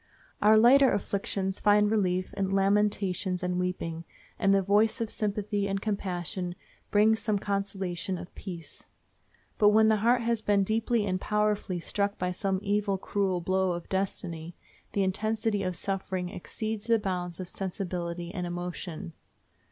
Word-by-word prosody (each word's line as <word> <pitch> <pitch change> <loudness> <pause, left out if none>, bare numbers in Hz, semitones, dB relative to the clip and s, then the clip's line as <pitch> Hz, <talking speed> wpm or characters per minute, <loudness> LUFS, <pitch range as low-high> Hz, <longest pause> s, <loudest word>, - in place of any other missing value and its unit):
Our 215 +1 +6
lighter 260 +4 +7
afflictions 195 -1 -1
find 210 0 +4
relief 185 -4 0
in 195 -1 -1
lamentations 195 -2 +1
and 180 0 0
weeping, 170 -2 -3 0.4
and 195 -3 +3
the 195 -1 +4
voice 205 +3 +3
of 225 -1 -2
sympathy 205 -1 -1
and 195 0 -1
compassion 180 -3 -3 0.3
brings 220 +2 +4
some 210 0 0
consolation 195 -2 -2
and 175 +1 -9
peace. 170 -6 -9 0.7
But 205 - +7
when 220 +1 +5
the 220 - +4
heart 235 +4 +3
has 230 -1 0
been 205 -2 +3
deeply 220 +2 +1
and 185 -1 -1
powerfully 210 -3 0
struck 200 +4 -1
by 180 0 -1
some 190 +1 -1 0.4
cruel 190 -2 -1
blow 185 +1 +1
of 170 -1 -7
destiny, 175 -3 -3 0.4
the 200 - +2
intensity 215 +2 0
of 185 -2 -2
suffering 190 -1 -2
exceeds 215 +4 -5
the 230 -1 +5
bounds 180 -4 -3
of 185 - -5
sensibility 175 -2 -4
and 180 -3 -3
emotion. 175 0 -5
195 Hz, 145 wpm, -28 LUFS, 180-210 Hz, 0.7 s, lighter